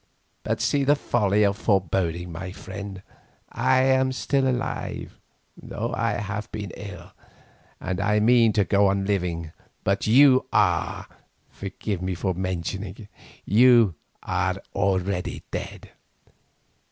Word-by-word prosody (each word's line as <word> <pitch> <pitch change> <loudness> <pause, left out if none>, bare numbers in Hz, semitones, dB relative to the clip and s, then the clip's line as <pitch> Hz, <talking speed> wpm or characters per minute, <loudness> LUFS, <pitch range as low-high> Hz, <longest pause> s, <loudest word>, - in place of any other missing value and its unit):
But - - -2
see 140 -1 +1
the 145 +2 +4
folly 105 -6 +1
of 100 -1 +2
forebodings, 90 -3 0
my 90 +3 -6
friend. 100 0 -8 0.5
I 130 0 +2
am 130 0 +3
still 135 +1 0
alive, 125 -2 -3 0.4
though - - -5
I 115 -2 0
have 105 +2 -4
been 105 -4 -5
ill, 100 -1 -9 0.7
and 95 +1 -3
I 105 +1 +2
mean 115 +1 +5
to 100 -1 +2
go 100 +1 +3
on 95 0 0
living, 85 -5 -2 0.3
but 100 +2 0
you 130 +3 +6
are—forgive 100 -1 -2
me 95 0 -2
for 95 +2 -1
mentioning 95 +1 -4
it—you 115 0 +2 0.3
are - - 0 0.2
already 95 -2 -1
dead. - - -6
100 Hz, 120 wpm, -24 LUFS, 95-115 Hz, 0.7 s, you